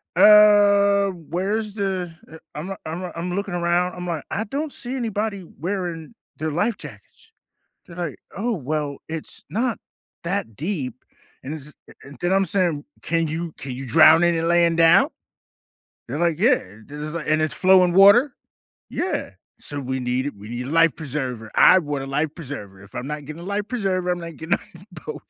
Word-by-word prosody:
uh, 205 -1 +6
where's 190 +5 -3
the" 190 -4 -2 0.2
e - - -9 0.2
I'm 185 +6 -5
I'm 175 +2 -5
I'm 175 +2 -3
looking 200 -2 -3
around, 175 +1 +1
I'm 180 0 -6
like, 165 -3 -3
"I 220 +3 -2
don't 285 +6 -3
see 255 +1 -5
anybody 215 -5 -2 0.2
wearing 175 0 -4 0.2
their 155 0 -2
life 205 +9 0
jackets." - - -13 0.6
They're 170 - -12
like, 170 -5 -4 0.2
"Oh, 230 +6 -1
well, 150 - -3
it's 160 -1 -6
not 235 +2 -1 0.4
that 170 - -3
deep," 140 - -4 0.4
and 140 - -5
this 150 0 -9 0.5
then 175 +2 +1
I'm 195 0 +3
saying, 170 -5 0 0.2
"Can 165 -1 0
you 165 +1 -4
can 135 - -6
you 135 0 -7
drown 160 +3 +7
in 175 - +3
it 165 - -1
laying 170 0 +3
down?!" 165 0 +6 1.0
They're 130 +5 -4
like, 170 -2 +1
"Yeah," 245 +5 +4 0.3
this 145 +1 -9
is 155 - -5
like 165 -2 -5
"And 155 0 +3
it's 155 - 0
flowing 185 -1 +5
water?" 205 +8 +6 0.5
"Yeah," 365 - -2 0.3
"So 145 -1 -6
we 130 0 -3
need 125 +1 -1
it, 145 - -6
we 105 +2 -11
need 120 +2 -5
a - - -5
life 165 -2 +4
preserver, 130 -7 -4
I 185 - +7
want 145 -4 -3
a - - -6
life 150 +3 -1
preserver, 105 - -8
if 100 - -16
I'm 125 - -4
not 150 -1 -5
getting 155 +3 -8
a - - -9
life 205 +1 -2
preserver, 190 -7 -1
I'm 180 0 0
not 170 -3 -8
getting 160 +2 0
on - - -18
this 185 - -14 0.2
boat." - - -8
170 Hz, 185 wpm, -22 LUFS, 150-195 Hz, 1.0 s, drown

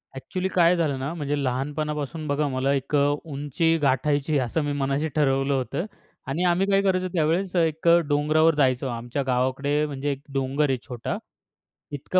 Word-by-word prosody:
Actually 180 +8 -3
काय 175 -2 +4
झालं 150 -5 0
ना, 140 +4 -3
म्हणजे 145 -3 -2
लहानपणापासून 150 +4 -3
बघा 145 +1 0
मला 135 +1 0
एक 140 +2 -2
अ, - - +5 0.3
उंची 150 +2 0
गाठायची 145 +2 +1
आहे - - +3
असं 160 +7 -1
मी 145 - -1
मनाशी 140 +3 0
ठरवलं 135 -2 +2
होतं. 135 +7 -2 0.4
आणि 145 +6 -1
आम्ही 180 +2 +2
काय 195 0 +3
करायचो 185 -1 +1
त्यावेळेस 175 +3 0
एक 160 -1 +1
अ, 170 0 +7
डोंगरावर 155 +2 +3
जायचो. 135 -2 +2
आमच्या 120 +3 -3
गावाकडे 135 +4 +1
म्हणजे 145 0 -3
एक 135 -1 -5
डोंगर 135 +2 0
आहे 130 - +1
छोटा. 120 -3 -4 0.7
इतका 145 +6 0
145 Hz, 170 wpm, -25 LUFS, 135-160 Hz, 0.7 s, अ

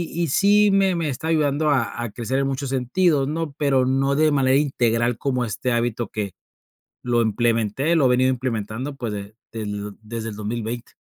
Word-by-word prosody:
y 170 - 0
y - - 0
sí 205 +6 +4
me 195 -1 +3
me 165 -3 -1
está 140 +4 -4
ayudando 155 -1 +1
a 130 -4 0
a 120 - -3
crecer 120 +4 -2
en 135 - +1
muchos 135 0 -3
sentidos, 135 +3 +1
¿no?, 155 0 -3
pero 135 -3 +2
no 135 +2 +1
de 155 +1 +3
manera 135 -1 +3
integral 120 -4 +1
como 125 -2 -1
este 115 +4 -2
hábito 120 -1 -1
que 105 -3 -4 0.7
lo 120 -1 +1
implementé 115 +6 +1
lo 140 -5 +4
he - - +5
venido 130 +1 +3
implementando, 125 +1 -3
pues, 120 -5 -4
de 100 +1 -7 0.2
del 105 -2 -5
desde 115 +1 -5
el 105 - -8
2020. 115 +2 -4
130 Hz, 190 wpm, -22 LUFS, 115-145 Hz, 0.7 s, he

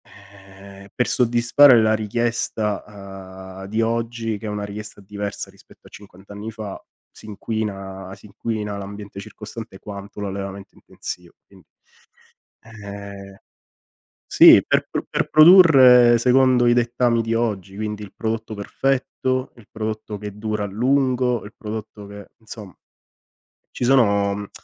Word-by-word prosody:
Ehm, 100 0 -16
per 125 - 0
soddisfare 120 +1 +5
la 110 0 +3
richiesta, 100 -4 -4
ehm, - - -7
di 110 +3 -1
oggi, 115 -1 -2
che 110 - -8
è - - -3
una 105 0 -4
richiesta 105 +1 -9
diversa 100 +1 -6
rispetto - - -20
a - - -17
cinquant' 100 0 -14
anni 105 +2 -7
fa, 105 -3 -8 0.3
si - - -15
inquina 100 -3 -5
si - - -19
inquina 105 0 -4
l'ambiente 100 0 -9
circostante 105 0 -10
quanto 100 0 -9
l'allevamento 100 0 -6
intensivo, 90 -1 -9
quindi 95 -4 -21 1.0
ehm, 100 -2 -10 0.9
sì, - - +8
per - - +1
pr - - -3
per - - -1
produrre 135 -8 +7
secondo 125 0 +3
i 120 - +4
dettami 120 0 +1
di 115 0 -2
oggi, 105 -5 -2
quindi 105 0 -4
il 100 - -13
prodotto 110 -1 -4
perfetto, 130 +3 -2
il 115 -4 -17
prodotto 110 -1 -5
che 105 0 -8
dura 105 -1 -3
a - - -2
lungo, 125 +2 0
il 105 - -11
prodotto 105 -1 -8
che 100 0 -11
insom 110 -3 -11 1.0
Ci - - -2
sono 100 -5 +2
105 Hz, 135 wpm, -21 LUFS, 100-115 Hz, 1.0 s, sì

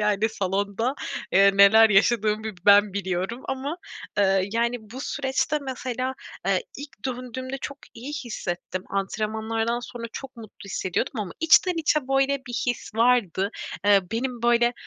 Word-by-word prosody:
Yani, 210 +1 +2
salonda, 200 +4 -1 0.4
eee, 195 +1 +6
neler 215 +3 +7
yaşadığımı 215 +1 +3
bir 220 -2 -4
ben 205 0 +6
biliyorum 190 +4 -2
ama, 270 +4 -3 0.4
ııı, 195 -1 +3
yani, 235 +1 0
bu 220 +4 -10
süreçte 275 +2 -1
mesela, 255 -1 -3 0.3
eee, - - +2
ilk 285 -1 -11
döndüğümde 255 +1 -5
çok 280 +2 -6 0.2
iyi 260 +6 -7
hissettim. 185 -9 -5
Antrenmanlardan 220 +4 -1
sonra 240 -1 -8
çok 265 -2 -8
mutlu 220 -3 -12
hissediyordum 190 +3 -2
ama 190 -5 -5
içten 330 +3 +5
içe 310 -1 +2
böyle 270 +1 +2
bir 245 - -7
his 245 -3 -3
vardı. 225 -5 +2 0.3
Eee, 200 -1 +6
benim, 240 +1 -3
böyle, 240 0 +4
230 Hz, 140 wpm, -25 LUFS, 200-260 Hz, 0.4 s, neler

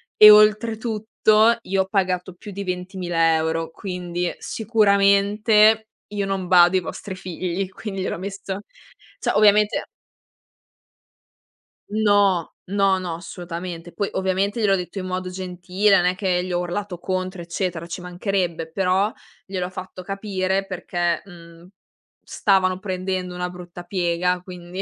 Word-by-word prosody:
e 215 - +10
oltretutto 220 +1 +3
io 190 0 +1
ho 190 - -2
pagato 185 -2 -1
più 200 +3 -11
di 200 +1 -5
20000€, 165 -3 0
quindi 180 -1 -4
sicuramente 210 0 +3 0.3
io 205 -1 -1
non 195 -2 -2
bado 175 0 +6
ai 185 - +3
vostri 190 +3 -7
figli, 185 +1 -4
quindi 195 0 -6
gliel'ho 185 - -2
messo 195 +1 -5 0.6
cioè - - 0
ovviamente 210 0 +4 2.0
No, 205 -4 +2
no, 195 -1 +2
no 175 -3 -4
assolutamente. 175 0 -7
Poi 200 -2 -2
ovviamente 190 +3 0
gliel'ho 200 -2 +4
detto 180 +2 -5
in 185 - -5
modo 185 0 -3
gentile, 185 +2 +1
non 175 - +2
è 180 +1 +2
che 185 -2 0
gli 185 - -5
ho 175 - +1
urlato 180 +1 -4
contro 185 0 -3
eccetera, 170 -1 -3
ci 170 +2 -6
mancherebbe, 180 -2 -2
però 190 +3 +1 0.3
gliel'ho 185 -2 -3
fatto 185 0 -8
capire 195 -1 -2
perché, 175 -2 -2
mhmm, 170 -2 -14 0.6
stavano 185 -2 +1
prendendo 185 -1 -3
una 180 0 -3
brutta 175 -1 -10
piega, 180 0 0
quindi 180 0 -8
185 Hz, 130 wpm, -22 LUFS, 180-200 Hz, 2.0 s, e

